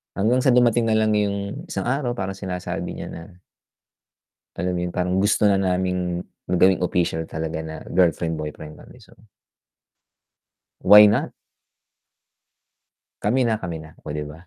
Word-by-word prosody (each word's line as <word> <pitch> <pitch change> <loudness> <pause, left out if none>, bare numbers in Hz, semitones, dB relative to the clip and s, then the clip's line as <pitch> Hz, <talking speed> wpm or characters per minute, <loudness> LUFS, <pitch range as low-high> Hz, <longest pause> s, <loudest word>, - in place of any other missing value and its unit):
Hanggang 115 +6 +2
sa 130 -1 +3
dumating 120 -1 +3
na 110 - +2
lang 110 0 +2
yung 100 -1 -3
isang 95 - -3
araw 130 -2 -1
parang 95 -3 -4
sinasabi 90 -2 -5
niya - - -7
na 90 +2 -12 1.1
alam 90 - -2
mo - - -2
yun 90 - -5
parang 90 +1 0
gusto 105 +2 +2
na 100 - +3
naming 90 -1 -1 0.2
gawing 90 +1 +3
official 85 -2 -1
talaga 80 0 -4
na 80 0 -7 0.2
girlfriend, 85 -2 +1
boyfriend 75 0 -8
kami - - -16
so - - -21 1.7
why 105 +2 +9
not? 105 +1 +1 1.9
Kami 125 +6 +1
na 110 - +1
kami 85 -5 -6
na, 80 0 -15
oh, 75 - -5
di 75 - -3
ba? 75 +1 -10
95 Hz, 150 wpm, -22 LUFS, 85-105 Hz, 1.9 s, why